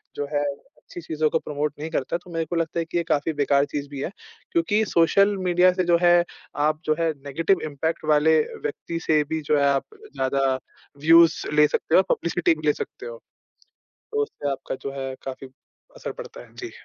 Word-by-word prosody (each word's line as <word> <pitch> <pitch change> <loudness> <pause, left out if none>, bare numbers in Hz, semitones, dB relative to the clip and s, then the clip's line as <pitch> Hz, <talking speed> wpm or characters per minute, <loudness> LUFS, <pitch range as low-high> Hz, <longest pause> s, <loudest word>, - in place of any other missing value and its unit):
जो 145 - -2
है 145 0 +1
अच्छी 145 +4 -8
चीज़ों 155 -1 0
को 160 - +1
प्रमोट 150 0 -3
नहीं 160 +2 -4
करता 155 +3 -1
तो 175 - -17
मेरे 165 -1 -1
को 170 - -4
लगता 165 0 -1
है 165 - -1
कि 175 - -3
ये 170 - +1
काफ़ी 160 0 0
बेकार 140 -1 +2
चीज़ 145 0 -5
भी 140 -2 -6
है। 175 - -3 0.4
क्योंकि 205 +6 +2
सोशल 200 +4 +3
मीडिया 180 +1 +5
से 185 - 0
जो 170 -1 +4
है, 175 0 +5 0.3
आप 155 +2 +1
जो 155 - +2
है 165 -1 +2
नेगेटिव 165 +7 +1
इम्पैक्ट 160 +3 -3
वाले 155 +1 +4 0.2
व्यक्ति 165 +3 -4
से 155 -1 +4
भी 160 0 -2
जो 150 - +4
है, 140 - +3
आप 140 -1 +1 0.3
ज़्यादा 135 +1 0 0.6
व्यूज़ 165 0 +6
ले 150 0 +6
सकते 160 - 0
हो, 190 - +8
पब्लिसिटी 170 -1 +1
भी 155 0 -5
ले 150 - +5
सकते 410 - -7
हो। - - -7 1.0
तो 435 0 +1
उससे 145 - -4
आपका 135 - -4
जो 135 - -4
है 135 0 -4
काफ़ी 135 0 -7 0.5
असर - - -5
पड़ता - - -10
है। - - -24
जी। - - -6
160 Hz, 205 wpm, -24 LUFS, 145-170 Hz, 1.0 s, हो